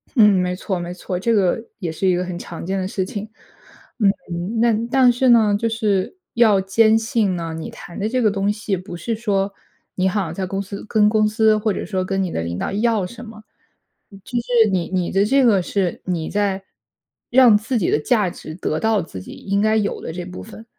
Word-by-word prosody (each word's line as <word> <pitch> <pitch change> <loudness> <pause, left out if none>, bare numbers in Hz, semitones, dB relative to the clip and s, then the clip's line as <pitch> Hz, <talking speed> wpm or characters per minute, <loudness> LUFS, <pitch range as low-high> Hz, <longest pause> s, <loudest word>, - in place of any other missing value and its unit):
嗯， 215 -4 +7
没 180 0 -1
错 185 0 -3
没 175 0 -5
错， 180 0 -4
这 230 +5 +1
个 195 -3 +2 0.2
也 175 -5 -3
是 175 +4 -1
一 185 - +4
个 180 - -1
很 180 -1 -5
常 170 -1 -8
见 190 +2 -2
的 185 - -2
事 195 -1 -2
情。 205 +2 -6 0.7
嗯， 195 0 -1
那 235 +1 +4 0.2
但 260 -2 +5
是 250 +2 +2
呢， 220 -4 +5
就 230 - 0
是 215 - -1 0.2
要 220 -4 +4
坚 220 +3 +4
信 225 -4 0
呢， 165 -2 -4
你 160 - -6
谈 170 - -11
的 205 - -1
这 255 +3 0
个 220 - +4
东 200 0 0
西， 210 -1 -2
不 180 0 -8
是 225 +8 -3
说 200 -3 -1 0.4
你 185 0 +1
好 200 +1 0
像 165 -3 -5
在 190 +2 -3
公 195 +2 -3
司 200 0 -7
跟 210 -2 +3
公 215 0 +3
司 215 0 +3
或 215 -1 0
者 - - -4
说 190 -3 -2
跟 195 +1 -1
你 185 -3 -2
的 - - -2
领 85 +2 -4
导 - - -2
要 215 -1 +1
什 235 +4 -10
么。 215 -1 -12 0.9
就 245 - +1
是 235 -2 +3
你 180 -3 -1
你 180 -2 -1
的 195 +1 +3
这 270 +4 +3
个 205 -6 +4
是， 185 -1 -2
你 170 -4 -2
在 200 -2 -1 0.7
让 245 -3 +6
自 225 +4 -2
己 195 - 0
的 - - +3
价 210 +3 +1
值 155 - -9
得 155 -3 -2
到 220 -2 +2
自 95 - -8
己 - - -11
应 200 +1 -2
该 215 0 +2
有 205 -2 -1
的 - - -5
这 175 +1 -6
部 180 0 -8
分。 220 +1 -12
200 Hz, 245 characters per minute, -21 LUFS, 185-220 Hz, 0.9 s, 嗯